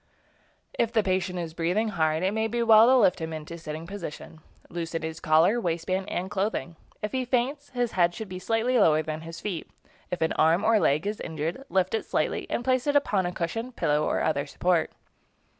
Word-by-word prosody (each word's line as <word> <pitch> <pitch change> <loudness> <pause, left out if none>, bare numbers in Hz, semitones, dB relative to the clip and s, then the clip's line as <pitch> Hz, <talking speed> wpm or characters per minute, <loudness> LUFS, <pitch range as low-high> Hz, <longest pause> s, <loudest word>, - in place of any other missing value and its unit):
If 230 -1 +2
the 220 -2 +2
patient 185 -1 -1
is 165 -2 -4
breathing 180 +7 0
hard, 160 -3 0
it 190 +2 +1
may 220 0 0
be 235 +1 -1
well 225 0 +7
to 260 +1 +6
lift 180 -8 +3
him 160 0 -4
into 155 +1 -7
a - - -6
sitting 155 0 -6
position. 170 -4 -8 0.3
Loosen 165 -1 -4
his 160 0 -5
collar, 165 +9 +3
waist 170 -4 -2
band, 190 +1 -1
and 185 +1 -3
clothing. 195 -4 -2 0.3
If 210 - -2
he 260 -1 -1
faints, 260 +4 -1
his 245 -2 -1
head 175 -1 +2
should 220 - -6
be 185 -1 -7
slightly 230 +5 +1
lower 155 -5 +4
than 155 0 -4
his 165 +1 -8
feet. 190 -6 -5 0.4
If 180 - -4
an 160 - +1
arm 165 +5 +3
or 225 -1 +4
leg 150 -1 +2
is 210 +1 -2
injured, 160 - -4
lift 185 -1 +1
it 225 - -1
slightly - - -1
and 240 - -2
place 255 +1 +1
it 290 - +2
upon 205 -10 +2
a - - -3
cushion, 225 +9 -4
pillow, 150 -7 +1
or - - 0
other 145 -2 0
support. 175 +3 +1
185 Hz, 215 wpm, -27 LUFS, 165-225 Hz, 0.4 s, well